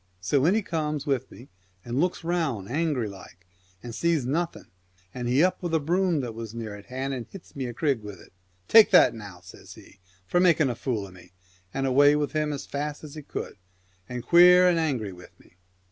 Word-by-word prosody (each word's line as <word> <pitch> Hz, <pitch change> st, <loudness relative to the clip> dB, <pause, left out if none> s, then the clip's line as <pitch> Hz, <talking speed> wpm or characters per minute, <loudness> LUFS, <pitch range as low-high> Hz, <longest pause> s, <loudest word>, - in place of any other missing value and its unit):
So 130 Hz, +9 st, +1 dB
in 190 Hz, -, +3 dB
he 220 Hz, -, 0 dB
comes 150 Hz, -4 st, -3 dB
with 135 Hz, -5 st, -1 dB
me 125 Hz, -, -14 dB, 0.4 s
and 120 Hz, +2 st, -2 dB
looks 180 Hz, +1 st, -1 dB
round 160 Hz, -, -2 dB
angry 145 Hz, -4 st, -1 dB
like 90 Hz, -2 st, -13 dB, 0.4 s
and 120 Hz, -1 st, -7 dB
sees 165 Hz, -1 st, 0 dB
nothing, 165 Hz, +6 st, -2 dB, 0.5 s
and 125 Hz, -1 st, -4 dB
he 130 Hz, +6 st, +3 dB
up 185 Hz, -, +1 dB
with 175 Hz, -2 st, -1 dB
a -, -, +3 dB
broom 175 Hz, +1 st, +1 dB
that 120 Hz, -3 st, -5 dB
was 115 Hz, 0 st, -8 dB
near 110 Hz, -3 st, -6 dB
hand 130 Hz, +5 st, -5 dB
and 125 Hz, -3 st, -6 dB
hits 195 Hz, -3 st, -14 dB
me 135 Hz, -3 st, -3 dB
a 120 Hz, -, -6 dB
crig 140 Hz, -4 st, 0 dB
with 105 Hz, -3 st, -9 dB
it. -, -, -18 dB, 0.3 s
"Take 225 Hz, -1 st, +7 dB
that -, -, +6 dB
now!" 100 Hz, -5 st, -10 dB
says 90 Hz, -, -13 dB
he, -, -, -17 dB, 0.3 s
"for 175 Hz, -, +1 dB
making 165 Hz, -6 st, +4 dB
a -, -, -5 dB
fool 110 Hz, -4 st, -3 dB
of 95 Hz, -, -13 dB
me! 90 Hz, -1 st, -17 dB, 0.2 s
" 90 Hz, 0 st, -34 dB
and 135 Hz, -, -2 dB
away 145 Hz, +3 st, +5 dB
with 150 Hz, -1 st, -1 dB
him 155 Hz, -1 st, -1 dB
as 140 Hz, -, -5 dB
fast 145 Hz, +1 st, -5 dB
as 150 Hz, -2 st, -10 dB
he 155 Hz, -, -8 dB
could, 140 Hz, -, -7 dB, 0.5 s
and 125 Hz, -1 st, -5 dB
queer 180 Hz, +3 st, +7 dB
and 175 Hz, -2 st, +3 dB
angry 125 Hz, -, -2 dB
with 90 Hz, 0 st, -16 dB
me. 90 Hz, -, -24 dB
135 Hz, 220 wpm, -26 LUFS, 115-160 Hz, 0.5 s, Take